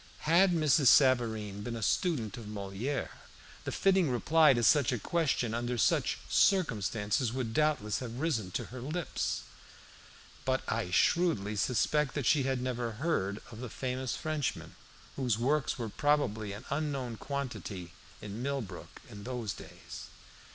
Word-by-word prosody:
Had 175 +4 +5
Mrs. 155 -4 +3
Savareen 110 -7 +4
been 115 +3 -4
a 115 - -4
student 125 - 0
of 115 -4 -9
Moliere, 105 +6 -3 0.5
the - - -2
fitting 190 -5 +3
reply 155 +6 +5
to 120 -2 +1
such 135 +4 +5
a 125 - 0
question 135 -3 0
under 120 +1 -2
such 110 - +2
circumstances 115 - +2
would 120 -3 -3
doubtless 145 -9 +1
have 120 -2 -6
risen 130 - 0
to - - -2
her 130 - -6
lips. 155 +6 -2 1.0
But 130 0 0
I 110 -4 -1
shrewdly 105 - +2
suspect 125 +6 +1
that 145 -4 -1
she 150 +5 +4
had 130 -1 -1
never 120 -2 -2
heard 110 - -1
of 110 - -9
the 125 -1 -5
famous 130 +2 -3
Frenchman, 155 -3 -3 0.4
whose 125 -6 +1
works 135 +4 +1
were 115 -3 -3
probably 110 -6 0
an 105 +2 -8
unknown 140 -5 -2
quantity 115 -11 -5 0.3
in 105 +2 -6
Millbrook 130 -9 -5
in 100 -1 -10
those 120 -4 -3
days. - - -10
125 Hz, 145 wpm, -31 LUFS, 110-145 Hz, 1.0 s, Had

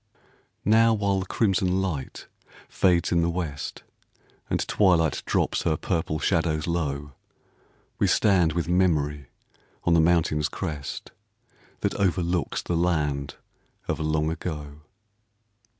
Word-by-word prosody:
Now 115 +2 +5
while 100 -2 +1
the 95 - -5
crimson 95 -4 +1
light 80 -9 -4 0.4
fades 90 -2 +2
in 85 -1 +3
the 85 - +1
west, 85 -5 -4 0.7
And - - -1
twilight 85 -7 +3
drops - - +1
her 80 -2 0
purple 80 -3 -1
shadows 80 -1 0
low 75 -4 -2 0.9
We - - +3
stand 90 -6 +3
with 85 -2 -1
Memory 75 -6 +1 0.6
on 85 - +2
the 85 - +5
mountain's 80 -2 +2
crest, 75 -6 -5 0.7
That - - 0
overlooks 90 -3 0
the 85 - -2
land 75 -5 0 0.5
of - - -2
Long 75 0 0
Ago. 75 -3 -6
85 Hz, 120 wpm, -25 LUFS, 75-90 Hz, 0.9 s, Now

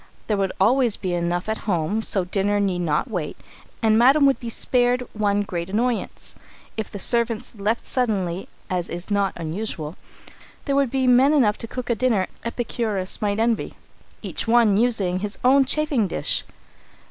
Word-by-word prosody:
There 210 - 0
would 195 -1 0
always 235 +2 +3
be 185 -2 -3
enough 175 +1 -1
at 220 0 -2
home 180 +4 0
so 195 -4 +4
dinner 205 +2 0
need 190 -3 0
not 165 - 0
wait, 175 -7 -4 0.5
and 220 0 +4
Madam 275 +4 +5
would 275 -1 +3
be 235 - -6
spared 245 +1 +1
one 205 -1 +1
great 175 -2 -5
annoyance. 235 +4 -2 0.4
If 220 -1 -4
the - - -7
servants 235 +1 +1
left 215 +2 -2
suddenly, 195 -8 -1 0.2
as 180 -2 -2
is 175 +4 -7
not 200 -1 +1
unusual, 165 -1 -5 0.7
there 280 - 0
would 280 -2 +2
be 265 +1 0
men 255 +4 +5
enough 225 -8 +3
to 230 - -6
cook 250 +1 -4
a - - +4
dinner 225 -5 +1 0.2
Epicurus 225 -5 -2
might 205 0 0
envy, 230 0 0 0.5
each - - -3
one 230 -3 +4
using 200 -5 +1
his 205 +1 -3
own 270 +2 +5
chafing 285 -6 +1
dish. - - -1
215 Hz, 170 wpm, -23 LUFS, 190-245 Hz, 0.7 s, Madam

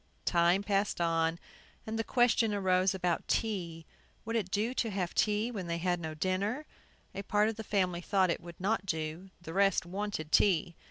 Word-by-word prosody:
Time 175 +3 +3
passed 200 -1 0
on, 165 -1 +1 0.5
and 220 +1 -3
the - - +1
question 230 -3 +2
arose 185 -1 +2
about 175 -2 -1
tea. 170 -7 -2 0.4
Would 225 +1 -3
it 210 -5 0
do 215 +6 0
to 235 -3 -1
have 190 -4 -2
tea 210 +3 +1
when 195 -6 -5
they 170 0 -1
had 175 +2 -1
had 175 0 +1
no 160 -2 -5
dinner? 200 - -1 0.5
A 195 - -4
part 210 +2 +2
of 225 - -4
the 220 - -6
family 185 -4 0
thought 185 -1 +2
it - - -3
would 170 -1 -11
not 195 +1 0
do; 160 +2 -3
the 160 - -7
rest 195 -2 +3
wanted 190 -4 -4
tea. 175 -4 +3
190 Hz, 195 wpm, -31 LUFS, 170-210 Hz, 0.5 s, Time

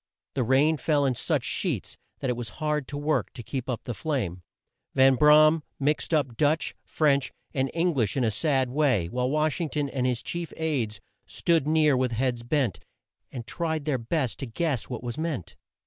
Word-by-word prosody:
The 135 - 0
rain 135 +6 +3
fell 145 -1 +2
in 130 - +2
such - - -1
sheets - - -2 0.3
that 135 - -1
it - - -1
was 120 -2 -5
hard 150 -3 -1
work 145 +2 -1
to 120 - -8
keep 125 +3 -4
up 125 - -3
the 120 - -4
flame. 110 - -2 0.5
Van 135 0 +6
Bra 150 +3 +7
am 155 0 +2 0.2
mixed 150 +4 0
up 145 -7 +1
Dutch, 155 +3 +1
French, 140 -3 +1 0.2
and 135 0 0
Eng 170 +1 +2
lish 120 -4 0
in 130 - +2
a 110 - +2
sad 135 -1 +1
way, 130 - +2
while 125 +3 -1
Wash 155 +3 +1
ing 165 - -1
ton 145 -2 -1
and 130 -2 -1
his 125 -2 -1
chief 170 -1 -4
aids 130 -10 -1 0.3
stood 165 -4 +1
near 155 -2 +4
with 125 -1 0
heads 120 0 0
bent, 120 - 0 0.5
and 120 -3 -6
tried 160 0 -2
their 140 -4 0
best 130 +1 -2
to 135 - -4
guess 135 +1 -2
what 125 -2 -5
was 120 +3 -4
meant. 155 - -3
140 Hz, 195 wpm, -27 LUFS, 125-155 Hz, 0.5 s, Bra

